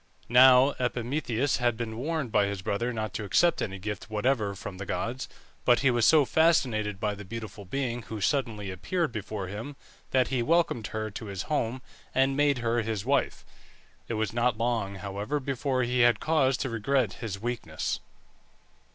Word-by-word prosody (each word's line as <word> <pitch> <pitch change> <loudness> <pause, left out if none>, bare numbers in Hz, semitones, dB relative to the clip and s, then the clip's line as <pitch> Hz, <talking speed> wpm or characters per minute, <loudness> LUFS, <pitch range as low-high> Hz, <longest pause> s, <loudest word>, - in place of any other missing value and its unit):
Now 130 +2 +7
Epimetheus 125 +1 0
had 120 -2 +1
been 110 -2 -4
warned 145 0 -2
by 105 -1 +3
his 100 -2 -4
brother 115 +6 -1
not 110 -4 -3
to 105 - -3
accept 170 - +3
any 95 -2 -3
gift 105 +3 -5
whatever 110 -2 0
from 95 -1 -8
the 100 - -5
gods; 120 +8 -3 0.3
but 120 -1 +4
he 135 -2 +4
was 120 -2 +3
so 155 -3 +6
fascinated 120 - +2
by 105 0 0
the 105 0 -8
beautiful 105 -1 -7
being 120 +3 -2
who 110 0 -7
suddenly 110 -5 -1
appeared 165 - -1
before 105 -2 -4
him, 110 +9 -6 0.3
that 130 -4 +2
he 125 -1 0
welcomed 155 -5 +1
her 110 0 -4
to 110 +2 -7
his 100 -2 -4
home, 130 -4 -2 0.3
and 135 +1 +3
made 145 -1 +3
her 115 +1 +2
his 110 -2 -3
wife. 140 +1 0 0.6
It 115 - -2
was 110 +1 -1
not 120 -1 +1
long, 115 -4 -1
however, 100 +9 -3
before 135 -1 -1
he 125 +1 0
had 120 -1 +5
cause 135 -5 +2
to 130 - -2
regret 115 0 +1
his 105 -4 -4
weakness. 120 +2 -3
120 Hz, 175 wpm, -28 LUFS, 105-130 Hz, 0.6 s, Now